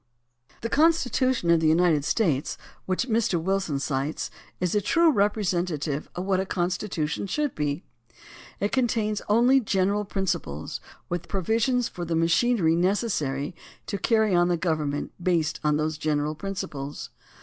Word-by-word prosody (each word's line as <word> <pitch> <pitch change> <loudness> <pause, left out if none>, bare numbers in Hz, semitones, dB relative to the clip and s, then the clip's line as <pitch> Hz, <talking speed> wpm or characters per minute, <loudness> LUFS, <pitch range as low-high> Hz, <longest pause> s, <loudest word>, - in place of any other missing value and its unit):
The 230 - -2
Constitution 260 - +2
of 170 - +5
the 160 - +2
United 160 -2 +3
States, 155 - 0 0.3
which 190 +7 0
Mr. 220 -6 +1
Wilson 190 -3 -1
cites, 140 +1 -2 0.3
is 180 -1 0
a 210 - +2
true 330 - +4
representative 180 - 0
of 180 - -3
what 190 -1 +1
a 190 - 0
con 175 -1 0
stitution 175 -1 -3
should 295 +3 -1
be. 145 +2 -2 0.8
It 205 - 0
contains 225 -5 0
only 245 +5 +5
general 200 -2 +1
prin 195 -1 -2
ciples, 75 - -3 0.3
with 175 -1 -4
provisions 225 +6 +1
for 175 - -7
the 170 -1 -1
machinery 165 +1 +3
necessary 170 - 0 0.3
to 200 - -3
carry 220 -2 +2
on 175 0 +4
the 175 -1 +1
government 155 -4 -1
based 165 -3 +1
on 150 -1 +2
those 155 0 -2
general 150 -1 0
prin 195 +5 -5
ciples. 140 -5 -5
180 Hz, 150 wpm, -26 LUFS, 155-215 Hz, 0.8 s, of